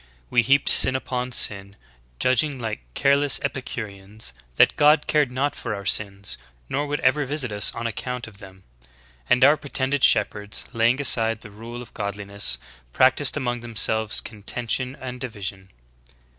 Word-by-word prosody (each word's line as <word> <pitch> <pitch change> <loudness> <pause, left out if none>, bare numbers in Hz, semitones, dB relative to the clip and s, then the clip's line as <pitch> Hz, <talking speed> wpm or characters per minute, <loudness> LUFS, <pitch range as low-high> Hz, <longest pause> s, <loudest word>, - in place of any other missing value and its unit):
We 120 - +4
heaped 140 +4 +2
sin 130 - +8
upon 125 -1 -3
sin, 100 -4 0 0.4
judging 130 - +1
like 110 - -5
careless 140 +1 +2
Epicureans, 105 - -6 0.2
that - - +4
God 150 0 +4
cared 150 -3 +1
not 135 +3 -2
for 115 -3 -5
our 100 -1 -8
sins, 100 -1 0 0.3
nor 145 - -2
would 145 +1 -2
ever 135 +3 +2
visit 135 -3 -3
us 105 -1 +4
on 115 - -5
ac 115 -3 -4
count 125 -2 -5
of 105 -3 -13
them. 95 -2 -14 0.7
And 125 - +4
our 145 +3 +6
pretended 140 -1 -1
shepherds, 105 0 +1
laying 115 +3 +2
aside 115 -5 +2
the 105 - -12
rule 115 +4 -9
of 120 - -17
godliness, 100 - -2 0.3
practiced 130 - +3
among 120 -4 -2
themselves 110 -2 +1
contention 120 +4 -3
and 125 -1 -8
division." 100 -6 -6
120 Hz, 155 wpm, -23 LUFS, 105-130 Hz, 0.7 s, sin